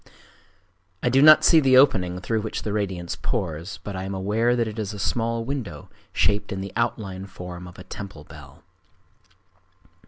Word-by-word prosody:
I 125 Hz, -, +3 dB
do 135 Hz, +2 st, +4 dB
not 155 Hz, +1 st, +8 dB
see 165 Hz, -, +7 dB
the 130 Hz, -3 st, +5 dB
opening 90 Hz, -10 st, +4 dB
through 110 Hz, +4 st, -1 dB
which 110 Hz, -, -4 dB
the 105 Hz, -, -3 dB
radiance 95 Hz, -5 st, -2 dB
pours, 90 Hz, -, -3 dB
but 100 Hz, -, -6 dB
I 95 Hz, -, -4 dB
am 95 Hz, 0 st, -4 dB
aware 110 Hz, +6 st, +1 dB
that 120 Hz, -2 st, 0 dB
it 110 Hz, +1 st, -6 dB
is 105 Hz, -1 st, -3 dB
a -, -, -7 dB
small 115 Hz, +3 st, -1 dB
window 115 Hz, -, -5 dB, 0.2 s
shaped 105 Hz, 0 st, +1 dB
in 95 Hz, -, -3 dB
the 100 Hz, +1 st, -6 dB
outline 100 Hz, -5 st, -2 dB
form 90 Hz, -1 st, -9 dB
of 90 Hz, -, -13 dB
a 90 Hz, -, -10 dB
temple 95 Hz, -8 st, -9 dB
bell. 75 Hz, -2 st, -14 dB
100 Hz, 180 wpm, -24 LUFS, 90-115 Hz, 0.2 s, not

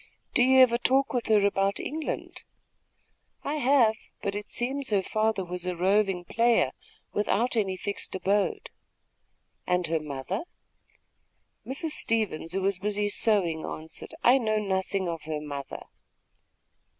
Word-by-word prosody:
"Do -, -, +3 dB
you 260 Hz, +1 st, +6 dB
ever 235 Hz, -2 st, +5 dB
talk 270 Hz, +3 st, +2 dB
with 245 Hz, -2 st, -1 dB
her 210 Hz, -2 st, +4 dB
about 195 Hz, 0 st, +1 dB
England?" 310 Hz, +1 st, -4 dB, 1.0 s
"I 295 Hz, +2 st, -2 dB
have; 260 Hz, -5 st, +4 dB, 0.3 s
but 200 Hz, -, -1 dB
it 205 Hz, 0 st, -6 dB
seems 265 Hz, +3 st, -1 dB
her 200 Hz, -3 st, +2 dB
father 215 Hz, -2 st, 0 dB
was 180 Hz, 0 st, -5 dB
a 180 Hz, -1 st, -2 dB
roving 190 Hz, 0 st, +2 dB
player, 230 Hz, +4 st, +3 dB, 0.4 s
without 225 Hz, +4 st, +1 dB
any 195 Hz, -4 st, 0 dB
fixed 200 Hz, 0 st, -4 dB
abode." 195 Hz, +2 st, 0 dB, 1.0 s
"And 180 Hz, 0 st, +1 dB
her 165 Hz, 0 st, 0 dB
mother?" 150 Hz, -, -4 dB, 1.2 s
Mrs. 300 Hz, +5 st, -2 dB
Stevens, 215 Hz, -, -1 dB
who 190 Hz, 0 st, -1 dB
was 195 Hz, -1 st, +1 dB
busy 205 Hz, +1 st, -1 dB
sewing, 195 Hz, -7 st, +2 dB
answered: 160 Hz, -, -6 dB
"I 255 Hz, +3 st, +6 dB
know 215 Hz, -3 st, 0 dB
nothing 190 Hz, -2 st, -1 dB
of 165 Hz, -2 st, -3 dB
her 155 Hz, -1 st, -3 dB
mother." 145 Hz, -2 st, -6 dB
205 Hz, 140 wpm, -27 LUFS, 180-235 Hz, 1.2 s, you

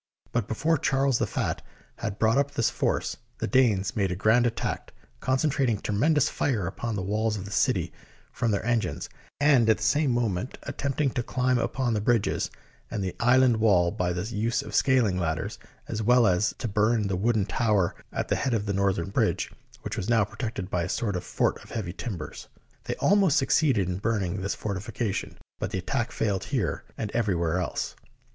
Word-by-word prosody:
But 115 Hz, -3 st, 0 dB
before 155 Hz, +7 st, +1 dB
Charles 135 Hz, -2 st, +2 dB
the -, -, +1 dB
Fat -, -, -2 dB, 0.4 s
had 105 Hz, -3 st, -4 dB
brought 115 Hz, +4 st, +3 dB
up 140 Hz, 0 st, +1 dB
this 130 Hz, -5 st, 0 dB
force, -, -, -1 dB, 0.2 s
the -, -, -2 dB
Danes 105 Hz, -5 st, +2 dB
made 100 Hz, -3 st, +1 dB
a -, -, -1 dB
grand 110 Hz, +5 st, +4 dB
attack, 115 Hz, -, -3 dB, 0.3 s
concen 130 Hz, +3 st, +1 dB
trating 120 Hz, -6 st, +1 dB
tremendous 145 Hz, +10 st, +2 dB
fire 115 Hz, -10 st, 0 dB
upon 115 Hz, +6 st, -3 dB
the 95 Hz, -, -2 dB
walls 105 Hz, +2 st, 0 dB
of 95 Hz, -, -6 dB
the 100 Hz, -, -8 dB
city -, -, +1 dB, 0.4 s
from 115 Hz, -, -1 dB
their 105 Hz, 0 st, 0 dB
engines, 120 Hz, -2 st, -1 dB, 0.3 s
and 140 Hz, -6 st, +5 dB
at 110 Hz, -, +5 dB
the -, -, -6 dB
same 145 Hz, -1 st, +3 dB
moment 120 Hz, -2 st, -1 dB
at 140 Hz, -, -7 dB
tempting 140 Hz, 0 st, 0 dB
to 120 Hz, -, -1 dB
climb 125 Hz, +1 st, +1 dB
upon 130 Hz, -3 st, 0 dB
the 105 Hz, -, 0 dB
bridges 115 Hz, -1 st, +1 dB, 0.4 s
and 105 Hz, -4 st, -3 dB
the 95 Hz, -, -3 dB
island 125 Hz, 0 st, +5 dB
wall 95 Hz, -6 st, +4 dB
by 90 Hz, 0 st, -1 dB
the 90 Hz, +1 st, -2 dB
use 115 Hz, +2 st, -1 dB
of -, -, -9 dB
scaling 120 Hz, -9 st, +3 dB
ladders, 80 Hz, -2 st, -2 dB, 0.3 s
as 110 Hz, -, -3 dB
well 120 Hz, +2 st, +5 dB
as 95 Hz, +1 st, +2 dB
to -, -, -3 dB
burn 105 Hz, +1 st, +2 dB
the 95 Hz, -, -1 dB
wooden 105 Hz, +1 st, +1 dB
tower 105 Hz, -3 st, +1 dB, 0.2 s
at -, -, -2 dB
the -, -, +1 dB
head 130 Hz, -4 st, 0 dB
of 105 Hz, -2 st, -1 dB
the 100 Hz, -, -1 dB
northern 95 Hz, -2 st, 0 dB
bridge, -, -, 0 dB, 0.3 s
which -, -, -4 dB
was 100 Hz, -, -3 dB
now 115 Hz, -2 st, +4 dB
protected 110 Hz, -2 st, -4 dB
by 90 Hz, -, +1 dB
a 90 Hz, -, -2 dB
sort 105 Hz, -2 st, -1 dB
of 90 Hz, -, -3 dB
fort -, -, 0 dB
of -, -, -16 dB
heavy 95 Hz, -7 st, -4 dB
timbers. 95 Hz, -7 st, -6 dB, 0.4 s
They -, -, -2 dB
almost 195 Hz, -6 st, +3 dB
succeeded 135 Hz, -, +3 dB
in 90 Hz, 0 st, -2 dB
burn 110 Hz, -1 st, 0 dB
ing 95 Hz, +2 st, -3 dB
this 100 Hz, -, -2 dB
fortification, 100 Hz, +1 st, -3 dB, 0.2 s
but -, -, -2 dB
the -, -, -3 dB
attack 115 Hz, +6 st, -2 dB
failed 100 Hz, -4 st, -1 dB
here -, -, -2 dB
and 105 Hz, -2 st, -3 dB
everywhere 90 Hz, -7 st, +1 dB
else. 90 Hz, -, -3 dB
110 Hz, 200 wpm, -27 LUFS, 95-125 Hz, 0.4 s, and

